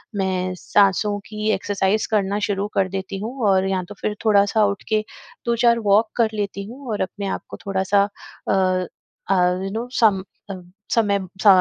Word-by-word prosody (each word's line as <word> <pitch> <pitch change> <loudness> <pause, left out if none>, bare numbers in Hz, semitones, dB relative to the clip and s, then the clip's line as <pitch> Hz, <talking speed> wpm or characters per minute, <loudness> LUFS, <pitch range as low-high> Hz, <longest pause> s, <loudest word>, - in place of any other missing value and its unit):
मैं 185 -2 -1
सांसों 205 +2 +2
की 215 0 -3
एक्सरसाइज़ 200 +1 0
करना 205 -1 +1
शुरू 200 0 -1
कर 190 -1 +1
देती 190 +1 -4
हूँ 230 +6 -5
और 190 0 +3
या 190 -1 0
तो 205 - -8
फिर 210 - -1
थोड़ा-सा 210 0 +4
उठ 200 -1 -2
के 215 -1 +2 0.4
2-4 235 0 +3
वॉक 215 +3 +4
कर 230 -2 +3
लेती 200 -1 -3
हूँ 255 +6 -10
और 210 - -2
अपने 200 +1 -3
आप - - -3
को - - -8
थोड़ा-सा 195 +1 +2 0.5
अ, - - +3 0.8
अ - - +5 0.3
यू 195 - -3
नो 225 +4 -3
सम 205 -5 +4 0.3
अ, - - -3 0.4
समय 205 -3 +3 0.3
स - - +4
205 Hz, 175 wpm, -22 LUFS, 195-215 Hz, 0.8 s, अ